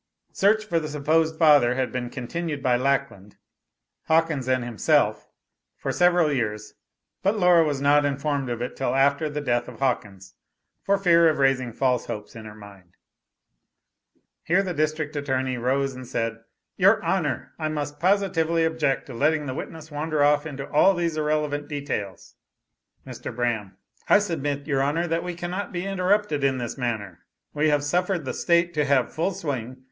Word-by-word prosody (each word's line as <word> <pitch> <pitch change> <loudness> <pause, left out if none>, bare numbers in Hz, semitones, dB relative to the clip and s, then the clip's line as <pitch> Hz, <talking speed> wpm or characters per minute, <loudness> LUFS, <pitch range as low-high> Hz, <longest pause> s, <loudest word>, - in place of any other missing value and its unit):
Search 215 +2 +2
for 170 -6 0
the 155 - -5
supposed 155 +2 +1
father 145 -7 +5
had 130 0 -1
been 125 -1 -4
continued 145 +4 -5
by 125 -1 +3
Lackland, 130 -6 -2 0.7
Hawkins 160 -5 +1
and 130 -1 +1
himself 115 -5 +1 0.5
for - - -3
several 175 -4 +3
years, 105 -4 -3 0.5
but 200 +3 +1
Laura 180 -3 +5
was 145 -3 -2
not 145 +1 +4
informed 140 -1 -1
of 120 0 -3
it 125 - -5
till 135 - -1
after 140 +3 +2
the 150 0 -4
death 120 -3 0
of - - -10
Hawkins, 100 -8 -3 0.5
for 200 0 +1
fear 170 -4 +5
of 155 - -1
raising 135 -3 +1
false 125 0 0
hopes 105 +2 -7
in 110 -1 -9
her 105 0 -10
mind. 100 -4 -15 1.4
Here 185 +4 +2
the 185 -2 -3
District 155 -1 -2
Attorney 130 -3 -1
arose 135 +3 0
and 130 -1 -9
said, 115 -2 -3 0.3
"Your 200 +3 +4
Honor, 165 -7 -1
I 155 - -1
must 145 -1 -4
positively 175 -3 +1
object 160 -4 0
to 135 - -10
letting 150 +5 +1
the 130 - -4
witness 160 +2 -8
wander 150 0 -1
off 145 +1 +3
into 140 -2 -6
all 190 +6 +5
these 170 -2 -1
irrelevant 150 -1 -1
details." 140 -10 -5 0.7
Mr. - - -7
Braham. 115 -5 -2 0.3
"I - - +7
submit 145 -8 -2
your 140 -3 0
honor, 150 +5 0
that 165 0 -1
we 180 -1 -5
cannot 180 +3 -4
be 175 +1 -4
interrupted 195 -5 0
in 135 -1 +2
this 120 -2 -4
manner. 115 -6 -4 0.3
We 150 +1 +2
have 145 -1 +1
suffered 175 +1 0
the 130 - -3
state 170 0 +1
to 150 -2 +1
have 140 -3 +1
full 175 +4 -1
swing. 130 -5 -4
145 Hz, 170 wpm, -24 LUFS, 130-165 Hz, 1.4 s, I